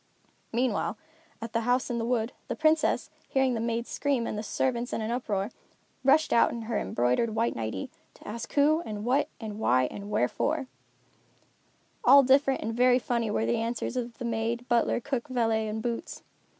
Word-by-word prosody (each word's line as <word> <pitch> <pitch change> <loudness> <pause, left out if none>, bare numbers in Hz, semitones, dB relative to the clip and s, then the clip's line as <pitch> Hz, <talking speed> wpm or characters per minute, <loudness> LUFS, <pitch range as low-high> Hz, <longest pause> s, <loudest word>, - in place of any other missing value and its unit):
Meanwhile, 240 -2 0 0.5
at 230 - -7
the 230 - +1
House 245 +2 +1
in 235 - -1
the 230 - -1
Wood, 235 -1 0 0.2
the - - -3
Princess, 315 0 +2 0.2
hearing 265 -1 +2
the 230 - -1
maid 230 +1 -1
scream 275 -4 -1
and - - -3
the 210 - -3
servants 240 +2 -1
in - - -1
an 220 +1 -2
uproar, 210 -5 -2 0.5
rushed 280 +4 +4
out 235 - +5
in 235 -1 -5
her 220 -1 -1
embroidered 125 - 0
white 230 +1 +1
nightie, 110 -4 -4 0.2
to - - -15
ask 230 +2 -6
who, 300 +3 +4
and 210 -4 -5
what, 265 +4 +2
and 215 -2 -6
why, 130 - +3
and 200 0 -7
wherefore. 270 - 0 1.4
All 275 +3 +8
different 270 +1 +3
and 225 +1 -2
very 250 +1 +4
funny 235 -2 -1
were 110 - 0
the 115 - +1
answers 230 +2 -2
of 240 -2 -4
maid, 235 0 -2
butler, 240 -1 +2
cook, 260 +1 -3
valet 225 -4 0
and 220 +1 -4
boots. 235 -1 -4
235 Hz, 180 wpm, -28 LUFS, 220-255 Hz, 1.4 s, All